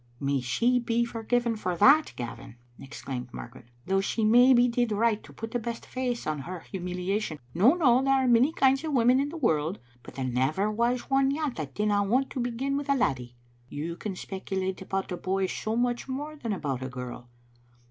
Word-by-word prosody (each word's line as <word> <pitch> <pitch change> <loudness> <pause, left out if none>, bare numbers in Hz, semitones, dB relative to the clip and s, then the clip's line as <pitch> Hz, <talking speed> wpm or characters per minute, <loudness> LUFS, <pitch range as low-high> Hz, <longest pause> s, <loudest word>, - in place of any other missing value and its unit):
"May 140 0 0
she 235 - +2
be 235 0 0
forgiven 235 0 -1
for 180 -5 -3
that, 285 - +5
Gavin!" 120 +1 -7 0.2
exclaimed 130 -2 -7
Margaret; 120 0 -10
" 120 - -33
though 195 +1 +1
she 215 +2 -1
maybe 245 +2 +6
did 240 -1 0
right 220 +1 +1
to - - -14
put 225 0 -7
the 245 - -1
best 235 0 -5
face 250 -2 -3
on 155 -1 -2
her 175 +5 -6
humiliation. 180 0 -3 0.2
No, 225 - +5
no, 260 -7 +4
there 270 0 +3
are 265 -1 +2
many 245 +5 +5
kinds 270 -2 +2
of 310 -2 -3
women 250 0 +4
in 280 +1 0
the 330 - -7
world, 165 - +1 0.2
but - - -13
there 135 - -3
never 135 - 0
was 235 +3 +1
one 270 0 +4
yet 290 -2 -2
that 145 -4 -6
didn't 205 -1 +1
want 260 +4 +1
to - - -4
begin 250 +3 -1
with 285 0 -5
a 280 - +4
laddie. 125 - -1 0.3
You 165 +4 -4
can 195 +1 -5
spec 190 +1 -8
ulate 190 -1 -2
about 190 0 -3
a 180 - -2
boy 190 +1 -1
so 215 +4 -3
much 240 +1 0
more 290 +4 -5
than 240 -7 -4
about 140 -9 -3
a 130 - -4
girl. 125 -1 -8
215 Hz, 210 wpm, -27 LUFS, 170-250 Hz, 0.3 s, maybe